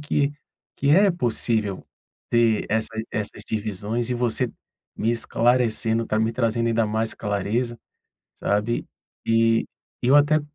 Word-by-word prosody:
que 145 -1 0 0.4
que 140 - -1
é 195 +5 +6
possível 115 - -1 0.5
ter 115 -2 +3
essas 110 0 -1
essas 105 -1 -2
divisões 110 +2 -2
e - - +1
você 120 +1 0 0.5
me 115 - 0
esclarecendo, 115 -1 +1
tá 110 - 0
me 110 +1 +1
trazendo 115 0 0
ainda 115 -1 +2
mais 110 +1 -1
clareza, 110 +4 -2 0.6
sabe? 105 +3 -1 0.4
E 115 0 +3 0.4
eu 130 +3 +4
até 150 +1 +4
115 Hz, 125 wpm, -24 LUFS, 110-120 Hz, 0.6 s, é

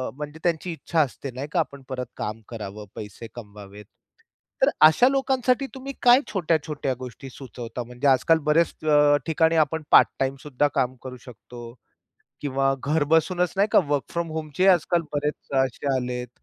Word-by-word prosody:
म्हणजे 150 +2 -8
त्यांची 175 0 -1
इच्छा 165 0 -1
असते 135 -1 -3
नाही 130 +4 -6
का, 175 - +1
आपण 140 -3 -3
परत 125 -1 -4
काम 110 +1 -5
करावं, 105 -2 -7
पैसे 105 +2 -8
कमवावेत. 105 -2 -11 0.8
तर - - +6 0.2
अशा 200 +11 +4
लोकांसाठी 265 -1 +1
तुम्ही 270 +1 -7
काय 245 +1 +7
छोट्या-छोट्या 155 -6 -1
गोष्टी 130 +2 -9
सुचवता? 125 -2 -8
म्हणजे 125 +4 -3
आजकाल 135 +5 +4
बऱ्याच 165 +2 +3
अ, 145 -1 +5
ठिकाणी 160 +1 +2
आपण 160 +2 -5
पार्ट-टाईम 135 0 +4
सुद्धा 145 0 0
काम 130 0 0
करू 125 -1 -8
शकतो. 120 0 -11 0.7
किंवा 135 -1 0
घर 150 +1 +1
बसूनच 175 +2 +2
नाही 200 +2 +3
का - - +7
वर्क 145 -2 0
फ्रॉम 170 -1 -2
होमचे 160 +3 -1
आजकाल 175 -1 +3
बरेच 150 0 -3
असे 130 +2 -6
आलेत. 125 -1 -4
145 Hz, 155 wpm, -24 LUFS, 125-165 Hz, 0.8 s, काय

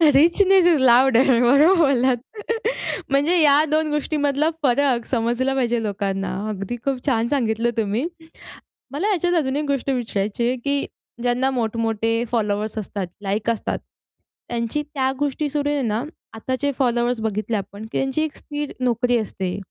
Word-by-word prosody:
"Richness 370 +5 +5
इस 325 -5 +4
loud," 255 -1 +5
बरोबर 270 +7 +5
बोललात. 265 -5 +3 0.9
म्हणजे 295 +6 +3
या 290 0 +5
2 310 0 +1
गोष्टींमधला 295 0 0
फरक 255 -2 +2
समजला 240 +3 0
पाहिजे 240 -3 0
लोकांना 195 -2 -2
अगदी 200 +3 -4
खूप 270 -1 -2
छान 230 -4 +2
सांगितलं 235 -4 0
तुम्ही. 225 +6 0 0.8
मला 375 +10 -1
याच्यात 355 -1 +1
अजून 265 0 -2
एक 300 - -1
गोष्ट 275 -1 -1
विचारायची 235 -3 -1
आहे, 255 - +1
की 280 +3 -1 0.4
ज्यांना 250 +2 +1
मोठमोठे 230 -1 -1
फॉलोवर्स 210 -1 -1
असतात, 200 -2 -4
लाईक 205 +3 -1
असतात. 230 - -2 0.7
त्यांची 235 +5 -2
त्या 275 -3 -1
गोष्टी 290 +1 -1
सुरू 290 0 -1
आहे 290 -1 0
ना, 225 +1 -1 0.3
आताचे 260 +5 -2
फॉलोवर्स 240 -1 +1
बघितले 215 +1 -1
आपण 200 +2 -7
की - - -2
त्यांची 270 +3 0
एक 310 - -4
स्थिर 295 -1 -5
नोकरी 245 0 +1
असते. 190 -3 -4
245 Hz, 145 wpm, -22 LUFS, 225-285 Hz, 0.9 s, Richness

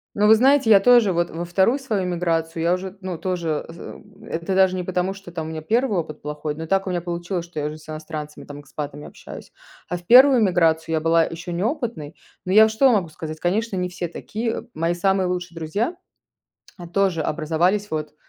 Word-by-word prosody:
Но, 210 0 +3
вы 220 - +8
знаете, 265 +1 +4
я 200 -2 +8
тоже 235 -3 +5
вот 170 0 0
во 170 +1 -5
2 190 +9 +2
свою 215 -8 -2
миграцию 165 -2 -1
я 170 +1 +2
уже, 185 +1 -2
н 190 - -15
ну, 185 -3 -4
тоже, 170 -5 -2
з 165 +1 -11
э, - - -9 0.3
это 170 +3 -2
даже 190 -1 +4
не 185 - -2
потому, 180 +1 -1
что 195 -2 -12
там 160 -2 -4
у - - -6
меня 160 -1 -5
1 220 +3 +1
опыт 155 -2 -5
плохой, 150 0 -4
но 160 +1 -6
так 195 +2 +1
у - - -2
меня 175 -1 -1
получилось, 175 +1 -4
что 170 -3 -6
я 145 - -2
уже 150 - -5
с 155 - -18
иностранцами, 155 -1 -7
там, 145 0 -10
экспатами, 145 0 -7
общаюсь. - - -11 0.4
А 180 - -2
в 175 - -19
1 260 +1 +7
миграцию 165 -4 +2
я 160 - +1
была 165 +1 +3
ещё 170 +1 -6
неопытной. 215 - -3 0.3
Но 185 - -1
я 220 +2 +7
что 260 +5 +3
могу 200 -8 +1
сказать: 155 0 -7
конечно, 200 +5 -1
не 180 0 -1
все 180 -1 -5
такие. 225 +7 -4
Мои 165 +2 0
самые 190 +1 +1
лучшие 180 -1 -4
друзья 200 - -2 1.0
тоже 190 -5 +1
образовались 170 +7 0
вот 155 -1 -4
175 Hz, 215 wpm, -22 LUFS, 160-195 Hz, 1.0 s, вы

